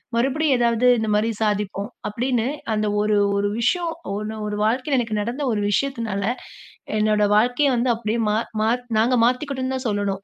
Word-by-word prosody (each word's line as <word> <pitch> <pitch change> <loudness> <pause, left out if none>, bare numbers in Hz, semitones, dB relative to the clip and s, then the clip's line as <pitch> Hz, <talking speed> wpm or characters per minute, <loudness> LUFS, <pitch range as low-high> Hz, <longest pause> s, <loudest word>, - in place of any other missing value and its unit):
மறுபடியும் 270 +4 +2
ஏதாவது 235 0 +2
இந்த 220 -1 -1
மாரி 215 +2 +1
சாதிப்போம். 205 -1 -1 0.2
அப்டின்னு 240 +2 -1 0.3
அந்த 215 0 0
ஒரு 210 0 +2 0.2
ஒரு 205 0 +1
விஷயோம், 335 +8 0 0.2
ஒண்ணு 215 +1 -4
ஒரு 210 0 -3
வாழ்க்கையில 255 +5 +1
எனக்கு 225 -3 -2
நடந்த 240 +7 -3
ஒரு 210 - -1
விஷயத்துனால, 230 -5 -1 0.8
என்னோட 210 0 +2
வாழ்க்கையே 245 +6 +3
வந்து, 240 +2 +1
அப்டியே 225 0 -2
மா 210 - +2 0.2
மா 220 - +2 0.3
நாங்க 240 +3 +3
மாத்திகிட்டோம்னு 260 +1 -1
தான் 260 -1 -3
சொல்லணும். 205 -2 -1
230 Hz, 160 wpm, -22 LUFS, 210-255 Hz, 0.8 s, வாழ்க்கையே